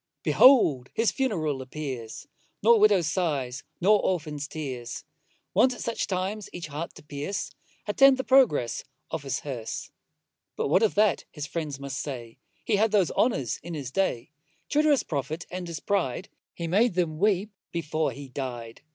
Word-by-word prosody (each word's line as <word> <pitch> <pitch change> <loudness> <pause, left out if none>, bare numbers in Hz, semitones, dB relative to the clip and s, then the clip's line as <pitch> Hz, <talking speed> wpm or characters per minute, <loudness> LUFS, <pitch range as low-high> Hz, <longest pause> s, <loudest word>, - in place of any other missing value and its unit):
Behold 150 - +5
his 225 0 +2
funeral 160 - -1
appears, 130 -4 -6 0.4
Nor 230 +1 +6
widow's 205 -5 +5
sighs, 145 -6 -1 0.2
nor 205 +3 +4
orphan's 150 -5 -2
tears, 130 -7 -6 0.5
Wont 255 -1 +4
at - - -9
such 230 - -2
times 195 +2 -3
each 175 - -6
heart 150 +4 -5
to - - -13
pierce, 150 +6 -4 0.3
Attend 270 +5 +5
the 260 - -2
progress 245 - +3 0.3
of - - -2
his 135 -1 -3
hearse. 125 -6 -5 0.6
But - - -1
what 185 - +4
of 220 - +2
that, 210 -1 +3
his 150 -2 -6
friends 150 -3 -4
may 140 0 -6
say, 125 -4 -5 0.3
He 210 - +2
had 220 +2 +3
those 200 -5 +2
honours 140 - +1
in 170 +1 -6
his 135 -4 -5
day. 140 -8 -1 0.4
True 295 - +3
to 310 - +3
his 285 -3 +4
profit 155 +3 -3
and 180 0 -5
his 165 -2 -5
pride, 190 -4 -1 0.3
He 170 - -4
made 195 +5 +2
them 160 -4 0
weep 205 +1 +2 0.2
before 160 -2 -1
he 140 0 -9
dy'd. 125 -4 -6
160 Hz, 170 wpm, -27 LUFS, 140-205 Hz, 0.6 s, Nor